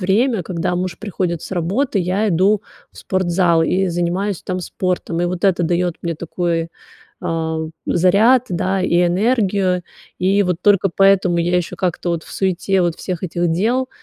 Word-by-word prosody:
время. 205 +3 +1
Когда 175 0 -2
муж 180 -1 -3
приходит 180 -5 -3
с - - -9
работы, 195 - 0
я 190 +4 0
иду 195 +4 +2 0.3
в - - -23
спортзал 175 -3 +1
и 185 +3 +1
занимаюсь 175 +3 -1
там 185 -1 -3
спортом. 180 -1 -2
И 175 - +1
вот 180 +1 -3
это 185 -3 +3
даёт 175 +1 0
мне 170 -1 -3
такой, 165 0 -2 0.5
а, 165 -2 -2 0.3
заряд, 210 +9 +4
да, 185 +2 -1
и 175 -1 +2
энергию. 195 -2 +1 0.4
И 195 +2 +3
вот 180 -2 -1
только 200 -1 +3
поэтому 195 -3 +4
я 175 +1 +1
ещё 175 - -3
как-то 180 -1 -2
вот 170 -2 -2
в - - -13
суете 190 0 0
вот 170 -2 0
всех 185 -1 -5
этих 175 0 -1
дел 240 +9 0
180 Hz, 165 wpm, -19 LUFS, 170-195 Hz, 0.5 s, заряд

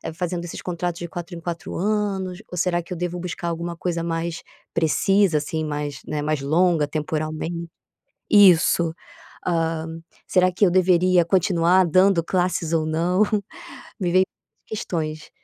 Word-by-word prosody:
fazendo 175 -1 -3
esses 170 - -7
contratos 175 -1 -3
de 175 - -5
4 175 0 -7
em - - -7
4 170 0 -5
anos? 195 -2 -1
Ou 180 - -6
será 175 0 +1
que 170 - -18
eu - - -6
devo 175 +1 -3
buscar 175 -1 -4
alguma 170 +1 -4
coisa 170 -1 -2
mais 165 0 -3 0.3
precisa, 170 +2 +3
assim, 155 +2 -2
mais, 150 -1 -4
né, 150 -1 -2
mais 155 -1 -1
longa 160 +1 +2
temporalmente?" 155 +2 -3 0.6
Isso, 175 -4 +5 0.5
hã. 165 -2 0 0.4
"Será 185 -1 +3
que 185 +3 +3
eu 180 - +3
deveria 180 -1 +4
continuar 180 0 +3
dando 185 +1 +4
classes 175 -2 0
ou 160 -1 +2
não?" 170 +5 +2 0.8
Me 180 -3 0
vem 185 +1 +5
muitas - - -54
questões. 155 -7 -4
170 Hz, 150 wpm, -23 LUFS, 160-180 Hz, 0.8 s, Isso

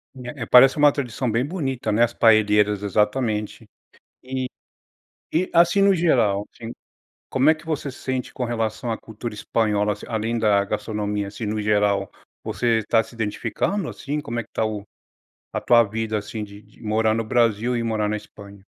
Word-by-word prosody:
É 125 0 -7
é - - -4
parece 130 +4 +7
uma 145 0 +6
tradição 130 -3 -3
bem 115 +4 +1
bonita 135 -9 -3
né, 110 +3 +3
as 120 0 +1
paelleras, 105 -2 +3
exatamente. 105 +1 -1 0.6
E 130 0 -3 0.8
e 180 +3 0
assim 175 +4 +4
no 200 0 +5
geral, 115 - +2
assim, 115 0 -8 0.6
como 135 +4 +4
é - - +4
que 155 +1 -16
você 150 -3 -2
se 130 - -14
sente 130 -1 -3
com 125 - -3
relação 115 0 -2
à 110 - -2
cultura 110 +1 -7
espanhola, 105 -1 0
assim 105 - -11
além 115 +1 -1
da 105 -2 +3
gastronomia, 105 -1 -3
assim 105 +3 -6
no 105 +1 -2
geral. 105 -2 +1 0.3
Você 115 -2 0
tá 115 - +5
se 115 - -16
identificando 115 - -2
assim? 150 +1 -4
Como 120 -4 -4
é - - -3
que - - -27
tá 110 - 0
o 105 -2 -4 0.7
a - - -2
tua 120 -1 +5
vida 110 0 -2
assim 105 +1 -5
de 100 0 -11
de 105 0 -22
morar 110 0 +1
no 115 - -1
Brasil 115 +1 +1
e 115 - -1
morar 110 -2 0
na 105 - -1
Espanha? 100 -1 -13
115 Hz, 185 wpm, -23 LUFS, 105-125 Hz, 0.8 s, parece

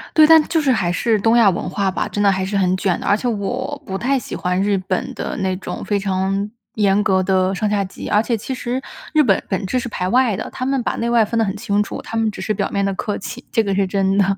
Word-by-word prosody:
对， 310 - +8
但 320 0 +8
它 - - -7
就 320 - +1
是 275 -3 +2
还 180 -7 +1
是 220 +4 +1
东 225 +3 +3
亚 220 -4 +6
文 175 - -2
化 200 -1 0
吧， - - -2
真 205 - -2
的 200 - +5
还 190 0 -1
是 200 +1 -1
很 185 -1 +2
卷 185 -2 0
的， - - -7
而 205 - +4
且 245 - -3
我 245 +6 -3
不 190 0 -3
太 270 +5 +1
喜 255 - -5
欢 180 +1 -1
日 200 0 +2
本 185 0 -3
的 - - -4
那 190 -1 -1
种 190 - -6
非 205 -1 0
常 195 +1 -1 0.3
严 205 -1 +3
格 190 -2 +2
的 185 0 +1
上 210 +2 -1
下 205 -1 +1
级。 190 - -8
而 210 - +4
且 230 0 -1
其 265 - -5
实 250 0 -3 0.3
日 305 -1 +5
本 200 -6 +2
本 190 0 -1
质 255 +7 0
是 240 - -5
排 180 -4 -3
外 245 -3 +3
的， 220 - -5
他 255 - -4
们 270 0 0
把 - - -1
内 235 0 -2
外 235 -2 +4
分 230 +2 -3
得 225 - +3
很 195 - -3
清 205 -1 0
楚， - - -6
他 225 - -5
们 225 -1 +2
只 - - -8
是 215 - -1
表 - - -2
面 200 0 0
的 195 - 0
客 205 +1 -3
气， - - -8
这 225 - +2
个 200 -2 -1
是 195 0 +2
真 195 0 +1
的。 195 0 +2
205 Hz, 315 characters per minute, -20 LUFS, 195-235 Hz, 0.3 s, 对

